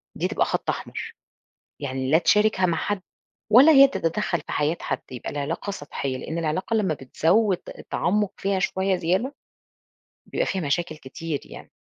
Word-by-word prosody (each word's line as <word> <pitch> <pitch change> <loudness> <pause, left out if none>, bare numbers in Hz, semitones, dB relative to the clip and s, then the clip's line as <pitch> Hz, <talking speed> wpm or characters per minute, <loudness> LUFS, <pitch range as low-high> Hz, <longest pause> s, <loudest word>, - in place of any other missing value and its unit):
دي - - 0
تبقى - - +1
خط - - -2
أحمر. - - -4 0.7
يعني 130 -1 -3
لا 160 - +6
تشاركها 210 0 +3
مع 170 -2 0
حد، 205 -1 -2 0.5
ولا 275 +8 +9
هي 275 -1 +8
تتدخل 175 -5 -1
في - - -8
حياة 150 +3 +1
حد، 130 - -2
يبقى 125 - -6
العلاقة 145 +7 -3
سطحية، 145 -7 -4
لإن 160 +5 -5
العلاقة 165 +7 -1
لما 195 -7 +2
بتزوّد 175 - +2 0.2
التعمق 205 +2 0
فيها 195 -1 0
شوية 190 0 +1
زيادة، 190 +12 0 0.9
بيبقى - - -1
فيها 190 -2 -1
مشاكل 155 +2 -1
كتير 150 +1 -5
يعني. - - -12
175 Hz, 155 wpm, -24 LUFS, 150-205 Hz, 0.9 s, ولا